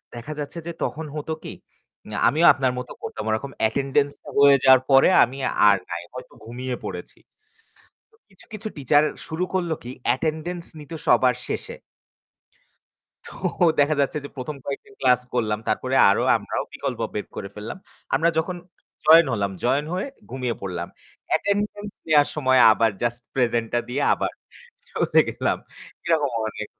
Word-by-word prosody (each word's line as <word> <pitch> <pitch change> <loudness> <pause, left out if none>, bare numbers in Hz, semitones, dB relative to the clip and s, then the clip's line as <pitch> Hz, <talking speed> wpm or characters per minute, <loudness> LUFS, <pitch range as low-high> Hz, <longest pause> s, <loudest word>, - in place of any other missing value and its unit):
দেখা 130 +6 -6
যাচ্ছে 145 +3 -6
যে - - -2
তখন 160 +1 -3
হতো 155 +1 -3
কী, - - -7 0.5
উম - - -11 0.2
আমিও 160 +4 +3
আপনার 130 -2 0
মতো 125 - -8
করতাম। 110 - -6
ওরকম 125 +6 -2
অ্যাটেন্ডেন্সটা 140 +5 0
হয়ে 140 -1 +7
যাওয়ার 130 -1 +7
পরে 135 +5 +7
আমি 130 +3 -3 0.3
আর 100 - +5
নাই। 85 0 -4
হয়তো 125 - -9
ঘুমিয়ে 125 +2 -4
পড়েছি। - - -7 0.9
তো 445 - -27
কিছু, 190 - -17
কিছু 215 +1 -5
টিচার 145 +2 +3 0.2
শুরু 160 +3 -2
করলো 175 -3 0
কী, 120 - -7
অ্যাটেন্ডেন্স 160 +6 -1 0.2
নিতো 150 +3 -9
সবার 125 -1 +4
শেষে। - - -4 1.5
তো - - -10 0.5
দেখা 145 +2 +4
যাচ্ছে 140 +2 0
যে - - -6
১ম 140 +3 -5
কয়েকদিন 170 +9 -6
ক্লাস 125 -2 +4
করলাম। 110 -3 0
তারপরে - - -1
আরও - - +3
আমরাও - - -3
বিকল্প - - -4
বের - - -3
করে 100 - -5
ফেললাম। 105 - -7 0.4
আমরা 165 - +3
যখন 175 +3 -1 0.5
জয়েন 160 +1 +8
হলাম, 100 -3 -1
জয়েন 140 +4 +2
হয়ে 185 +7 -2 0.2
ঘুমিয়ে 125 -2 -2
পড়লাম। 90 -3 -4 0.4
অ্যাটেন্ডেন্স 205 +3 -1 0.2
নেয়ার 150 -2 +4
সময়ে 130 -4 +3
আবার 110 +1 +2
জাস্ট 120 0 -1
প্রেজেন্টটা 120 -2 +1
দিয়ে 135 +4 -2
আবার - - -3 0.6
চলে - - +2
গেলাম। - - -1 0.5
এরকম 155 -5 +1 0.2
অনেক - - -6
140 Hz, 150 wpm, -23 LUFS, 120-160 Hz, 1.5 s, জয়েন